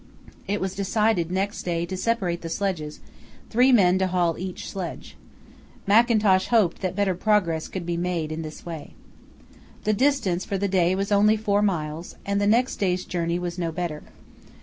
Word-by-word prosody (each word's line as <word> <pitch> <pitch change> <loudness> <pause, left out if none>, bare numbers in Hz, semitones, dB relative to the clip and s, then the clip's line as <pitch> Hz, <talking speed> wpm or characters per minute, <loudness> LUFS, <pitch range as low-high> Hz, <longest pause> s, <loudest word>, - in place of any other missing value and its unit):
It 205 +1 -1
was 190 0 -2
decided 200 -3 +1
next 195 +2 -1
day 170 -1 -1
to 185 +2 -5
separate 185 -4 -1
the 165 - -6
sledges, 165 -5 -3 0.5
three 250 +3 +5
men 190 -6 +5
to 190 - +2
haul 175 -3 +1
each 185 +1 -6
sledge. 185 -3 -6 0.7
Mackintosh 210 -3 +4
hoped 215 -8 +2
that 185 -1 -2
better 200 -2 +1
progress 180 -4 +1
could 185 -3 -6
be 170 0 -2
made 170 -3 -2
in 160 +1 -4
this 155 -1 -9
way. 165 -3 -8 0.9
The 215 - +2
distance 210 -8 +1
for 195 - -3
the 200 +1 0
day 185 -1 +2
was 195 +2 -2
only 210 +2 +4
four 205 -1 +1
miles, 165 -4 -2
and 200 0 0
the 205 - +2
next 240 +5 +2
day's 185 -2 0
journey 170 -1 -1
was 175 0 -4
no 170 -2 -1
better. 160 -3 -4
185 Hz, 175 wpm, -24 LUFS, 170-205 Hz, 0.9 s, three